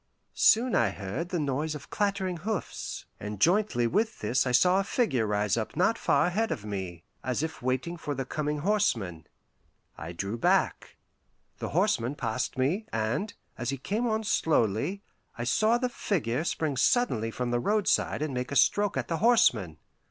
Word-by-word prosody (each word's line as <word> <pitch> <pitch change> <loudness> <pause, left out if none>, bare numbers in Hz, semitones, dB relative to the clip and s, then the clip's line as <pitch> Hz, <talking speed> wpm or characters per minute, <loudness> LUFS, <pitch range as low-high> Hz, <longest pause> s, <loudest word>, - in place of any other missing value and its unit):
Soon 240 +2 +4
I 115 -3 +3
heard 100 - -5
the 180 - -1
noise 150 +2 -1
of 135 -6 -10
clattering 195 -3 -1
hoofs, 205 +4 -4
and 105 0 -6
jointly 175 - +3
with 215 - 0
this 130 +2 0
I - - +1
saw 180 +9 +4
a - - +1
figure 140 - 0
rise 105 0 +1
up 110 - -3
not 185 +8 +3
far - - +2
ahead 215 +6 0
of 105 - -4
me, 95 -5 -5 0.2
as 130 +3 -1
if 160 0 -5
waiting 130 +7 -1
for 145 -3 -4
the 135 0 -3
coming 150 +2 -2
horseman. 115 - 0 0.7
I - - -6
drew 100 +6 -4
back. - - +1 0.6
The - - -4
horseman 120 +5 +1
passed 125 0 -3
me, 165 +12 0
and, 115 - -2 0.2
as 120 0 -2
he 135 - -2
came 210 - -2
on 220 -1 0
slowly, 160 - +1 0.3
I 120 - -3
saw 215 - +3
the 250 +1 0
figure 155 - -1
spring 155 -5 -1
suddenly 130 - +2
from 120 +1 -3
the 120 - +1
roadside 205 - +1
and 150 -3 -3
make 125 +1 -3
a - - -3
stroke 205 +7 +3
at - - -2
the 165 - -1
horseman. 125 - +3
145 Hz, 175 wpm, -28 LUFS, -, 0.7 s, Soon